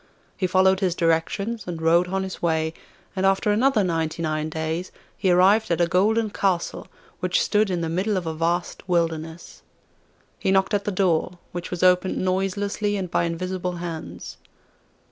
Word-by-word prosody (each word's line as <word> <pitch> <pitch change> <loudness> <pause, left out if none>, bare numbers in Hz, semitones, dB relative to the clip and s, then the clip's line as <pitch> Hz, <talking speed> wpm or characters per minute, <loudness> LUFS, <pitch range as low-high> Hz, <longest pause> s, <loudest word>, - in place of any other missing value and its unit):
He 185 - 0
followed 190 +1 +3
his 185 -3 0
directions, 180 +6 0
and 170 -2 -4
rode 170 +2 +3
on 190 +1 -1
his 190 -1 -7
way, 160 -1 0 0.4
and 190 - -1
after 195 +2 +3
another 225 0 +3
ninety 165 -2 -1
nine 155 0 -1
days 160 +2 -3 0.2
he 190 - 0
arrived 190 +5 +4
at 170 - +1
a 175 - +4
golden 210 +5 +2
castle, 190 -4 -1 0.3
which - - +1
stood 215 - +2
in 180 -2 -1
the 165 - -1
middle 190 +5 0
of 180 - -3
a 160 - -2
vast 170 +3 -2
wilderness. 165 -1 -2 0.8
He - - -1
knocked 190 +1 +2
at 205 -1 0
the 205 - 0
door, 180 -2 +1
which 175 0 -5
was 180 0 -3
opened 180 +1 +3
noiselessly 200 +2 -1
and 185 -3 -4
by 170 - +2
invisible 180 +2 -3
hands. 160 - -7
180 Hz, 170 wpm, -24 LUFS, 165-195 Hz, 0.8 s, arrived